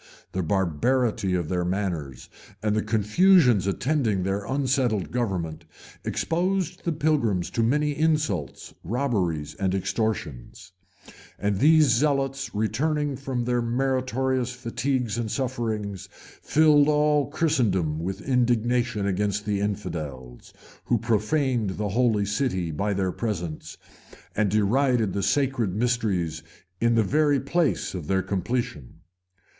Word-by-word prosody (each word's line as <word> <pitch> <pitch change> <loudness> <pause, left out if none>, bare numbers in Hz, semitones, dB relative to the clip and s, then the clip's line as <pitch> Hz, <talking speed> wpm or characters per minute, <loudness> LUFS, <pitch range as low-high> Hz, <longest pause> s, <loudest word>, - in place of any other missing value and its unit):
The 95 - -2
barbarity 95 - +1
of 85 -3 -1
their 90 +1 -1
manners, 85 -9 -3 0.4
and 105 -1 +1
the 110 - +2
confusions 115 - +4
attending 110 -3 0
their 100 +2 -2
unsettled 130 -7 0
government, 90 -9 -2 0.4
exposed 180 +1 -1
the 170 - +1
pilgrims 145 - 0
to 115 - 0
many 145 +5 +1
insults, 150 - -1
robberies, 95 - -1
and 95 -1 -1
extortions; 95 - -3 0.7
and 100 -1 -1
these 155 +3 +6
zealots, 135 +2 +1
returning 145 +7 0
from 130 -2 -3
their 120 0 +1
meritorious 130 +1 0
fatigues 125 -1 -2
and 115 -2 -2
sufferings, 110 -6 -3 0.3
filled 150 -2 +4
all 150 -1 +3
Christendom 100 - +1
with 95 +8 -5
indignation 120 -3 +1
against 100 +1 -1
the 100 -1 0
infidels, 75 - -5 0.3
who 120 - +2
profaned 115 0 0
the 105 0 -2
holy 110 -1 +2
city 100 -5 -1
by 100 +6 -1
their 95 -1 0
presence, 90 -8 -4 0.6
and 105 -1 +2
derided 110 +1 +2
the 100 - -1
sacred 120 -3 0
mysteries 105 -9 0 0.4
in 115 0 +2
the 115 - +4
very 145 +5 +2
place 155 +4 0
of 85 -6 -6
their 95 -1 +1
completion. 100 - -3
115 Hz, 120 wpm, -25 LUFS, 95-135 Hz, 0.7 s, these